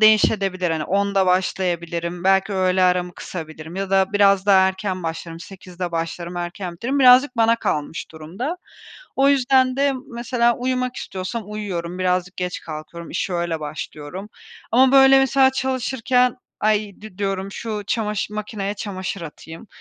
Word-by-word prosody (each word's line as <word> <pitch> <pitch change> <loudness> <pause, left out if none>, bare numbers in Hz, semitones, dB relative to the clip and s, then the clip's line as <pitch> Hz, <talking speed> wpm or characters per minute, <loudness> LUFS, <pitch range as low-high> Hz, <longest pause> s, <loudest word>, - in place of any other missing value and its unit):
değişebilir. 195 -4 +4
Hani, 155 -1 -1
10.00'da 200 -1 +1
başlayabilirim, 175 -1 -1
belki 195 +1 +3
öğle 185 -1 +2
aramı 180 -1 +2
kısabilirim 160 0 -8
ya 195 0 -3
da 195 +1 +2
biraz 200 -1 +4
daha 190 -1 +6
erken 190 -1 -4
başlarım, 165 0 -5
08.00'de 180 -1 -7
başlarım, 170 +1 -4
erken 175 +1 -4
bitiririm, 255 +10 -2
birazcık 255 +1 +6
bana 230 0 +4
kalmış 150 -6 -3
durumda. 185 - -5 0.6
O 275 +1 +4
yüzden 260 -1 +3
de 280 0 +2 0.2
mesela 235 0 +1
uyumak 255 0 -2
istiyorsam 190 +5 -5
uyuyorum, 185 -5 -5
birazcık 180 0 0
geç 180 0 -3
kalkıyorum, 160 +2 -8
işe 185 - -2
öyle 170 -2 -2
başlıyorum 150 +5 -7 0.4
ama, 260 +3 +5
böyle, 270 0 +7
mesela 270 0 +4
çalışırken, 260 -1 +1 0.2
ay, 210 -1 +1
di 205 -3 -12
diyorum, 195 0 -2
şu 215 -2 -4
çamaşır 210 -2 -2
makineye 210 -1 -4
çamaşır 195 -2 -5
atayım, 165 +4 -10
195 Hz, 140 wpm, -21 LUFS, 175-230 Hz, 0.6 s, böyle